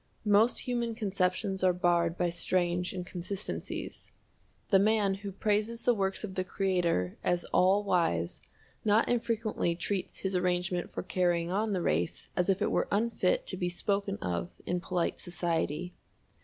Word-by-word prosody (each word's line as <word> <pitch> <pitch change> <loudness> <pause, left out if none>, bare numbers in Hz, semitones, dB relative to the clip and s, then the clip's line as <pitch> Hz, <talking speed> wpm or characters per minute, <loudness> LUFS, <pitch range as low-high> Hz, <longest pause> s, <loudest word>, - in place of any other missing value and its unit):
Most 210 +3 +4
human 235 -2 -2
conceptions 190 -2 0
are 185 -1 +5
barred 175 -1 +2
by 175 -1 +1
strange 175 +1 0
inconsistencies. 185 +2 -5 0.6
The 195 - +7
man 210 -1 +3
who 200 +1 -6
praises 210 +4 0
the 245 - +4
works 195 -2 -1
of 200 -3 -5
the 185 - -1
Creator 180 - 0
as 175 0 +1
all 190 +3 +4
wise 125 - 0 0.4
not 215 +2 +4
infrequently 230 -7 0
treats 190 +2 -3
His 190 -1 -1
arrangement 180 0 0
for - - -4
carrying 175 -2 +1
on 210 +2 0
the 180 -3 -1
race 85 +3 -1
as 180 +1 +1
if 195 - +2
it - - +1
were - - +1
unfit 235 - +1
to - - -5
be 180 - -1
spoken 200 +2 -1
of 85 -1 -2 0.2
in 180 0 0
polite 180 -2 -1
society. 175 -1 -2
185 Hz, 155 wpm, -30 LUFS, 175-205 Hz, 0.6 s, The